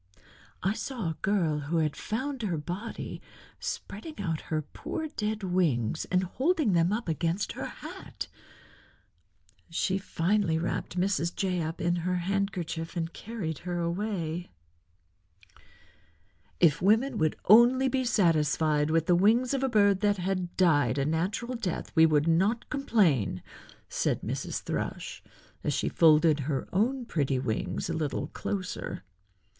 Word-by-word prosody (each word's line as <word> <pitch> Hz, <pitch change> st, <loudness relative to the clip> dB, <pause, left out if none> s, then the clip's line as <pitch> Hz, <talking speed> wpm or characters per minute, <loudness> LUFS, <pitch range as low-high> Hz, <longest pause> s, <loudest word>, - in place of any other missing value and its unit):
I 195 Hz, -, +2 dB
saw 225 Hz, -7 st, -3 dB
a 160 Hz, -, -8 dB
girl, 175 Hz, -7 st, +1 dB
who 150 Hz, +4 st, -2 dB
had 155 Hz, -2 st, +1 dB
found 260 Hz, +4 st, -3 dB
her 185 Hz, -7 st, -1 dB
body, 180 Hz, +9 st, -5 dB, 0.4 s
spreading 260 Hz, +9 st, -6 dB
out 165 Hz, -6 st, -2 dB
her 155 Hz, -1 st, 0 dB
poor 315 Hz, -, -5 dB
dead 215 Hz, -6 st, -3 dB
wings 160 Hz, -, +1 dB
and 180 Hz, 0 st, +1 dB
holding 270 Hz, -, +1 dB
them 170 Hz, +1 st, +3 dB
up 220 Hz, 0 st, -2 dB
against 170 Hz, +4 st, -1 dB
her -, -, -5 dB
hat. -, -, -8 dB, 1.4 s
She 190 Hz, +3 st, 0 dB
finally 190 Hz, -2 st, +1 dB
wrapped 175 Hz, +2 st, -3 dB
Mrs. 180 Hz, -2 st, 0 dB
Jay 185 Hz, -3 st, 0 dB
up 160 Hz, +1 st, -4 dB
in 175 Hz, +1 st, +1 dB
her 180 Hz, +2 st, -1 dB
handkerchief 180 Hz, -3 st, -2 dB
and 165 Hz, 0 st, -2 dB
carried 195 Hz, -10 st, -5 dB
her 175 Hz, -1 st, -3 dB
away." 175 Hz, -1 st, -2 dB, 2.1 s
"If 165 Hz, -2 st, +4 dB
women 225 Hz, +8 st, +3 dB
would 155 Hz, -1 st, +2 dB
only 240 Hz, +5 st, +7 dB
be 260 Hz, 0 st, +1 dB
satisfied 155 Hz, -, +2 dB
with 165 Hz, 0 st, +2 dB
the 175 Hz, -, +4 dB
wings 225 Hz, +8 st, +4 dB
of 270 Hz, -, 0 dB
a 270 Hz, -, +1 dB
bird 205 Hz, -4 st, +4 dB
that 205 Hz, 0 st, +2 dB
had 185 Hz, -1 st, -2 dB
died 145 Hz, -7 st, +3 dB
a 135 Hz, -, +1 dB
natural 180 Hz, -, -1 dB
death 205 Hz, -8 st, -3 dB
we 160 Hz, 0 st, +7 dB
would 150 Hz, 0 st, +2 dB
not 195 Hz, +8 st, +1 dB
complain," 175 Hz, -, +2 dB, 0.4 s
said -, -, -1 dB
Mrs. -, -, -3 dB
Thrush, -, -, -4 dB, 0.4 s
as -, -, 0 dB
she -, -, 0 dB
folded 155 Hz, -1 st, +5 dB
her 140 Hz, -1 st, -2 dB
own 245 Hz, +6 st, +1 dB
pretty 140 Hz, -, 0 dB
wings 125 Hz, -4 st, -2 dB
a 165 Hz, -, -2 dB
little 155 Hz, -3 st, -2 dB
closer. 185 Hz, -, -4 dB
180 Hz, 140 wpm, -29 LUFS, 160-210 Hz, 2.1 s, only